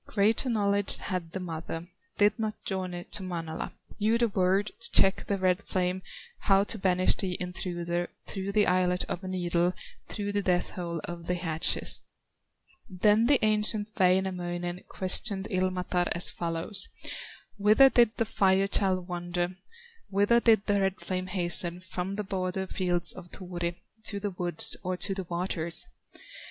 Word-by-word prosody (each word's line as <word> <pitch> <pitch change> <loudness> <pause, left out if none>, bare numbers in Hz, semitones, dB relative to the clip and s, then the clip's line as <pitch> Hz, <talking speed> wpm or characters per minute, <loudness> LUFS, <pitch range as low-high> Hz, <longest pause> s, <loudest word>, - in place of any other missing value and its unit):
Greater 220 +5 +1
knowledge 205 -3 +2
had 180 -4 -4
the 190 - -4
mother, 165 -1 -6 0.3
Did 205 +1 +3
not 215 -1 -4
journey 185 -2 -3
to - - -2
Manala, 165 -3 -5 0.3
Knew 220 +2 +3
the 235 -1 +2
word 195 +1 +1
to 230 - -2
check 195 - +4
the 200 - 0
red 185 0 +1
flame, 185 -1 -1 0.4
How 195 -1 +4
to 210 +1 0
banish 185 -1 +2
the 185 -2 -2
intruder 175 -1 -3 0.2
Through 195 0 -4
the 210 -1 +4
eyelet 180 0 +2
of 180 - -5
a - - -5
needle, 175 -1 0 0.3
Through 205 -1 -4
the 205 0 0
death 180 -2 0
hole 170 -3 -4
of 170 -1 -7
the 180 - +1
hatchet." 165 -1 0 0.9
Then 210 +4 +3
the 265 -5 +4
ancient 215 0 +1
Wainamoinen 180 -2 0
Questioned 190 +1 0
Ilmatar 185 -1 0
as 170 - +3
follows: 170 +4 +3 0.7
"Whither 215 +7 +6
did 235 -2 +4
the 230 - +1
Fire 195 -1 +2
child 185 -3 0
wander, 175 0 -3 0.5
Whither 205 +4 +3
did 220 -3 +4
the 200 -1 +2
red 195 -1 0
flame 185 0 -3
hasten, 175 -1 +2
From 185 +1 -4
the 210 - -3
border 190 -1 -2
fields 175 -3 0
of 175 -2 -11
Turi, 175 -2 -4 0.3
To 205 - -1
the 205 0 -3
woods, 175 -2 +2
or 185 -1 -3
to 195 - -1
the 190 -1 -5
waters?" 170 -1 -1
185 Hz, 155 wpm, -28 LUFS, 175-200 Hz, 0.9 s, Whither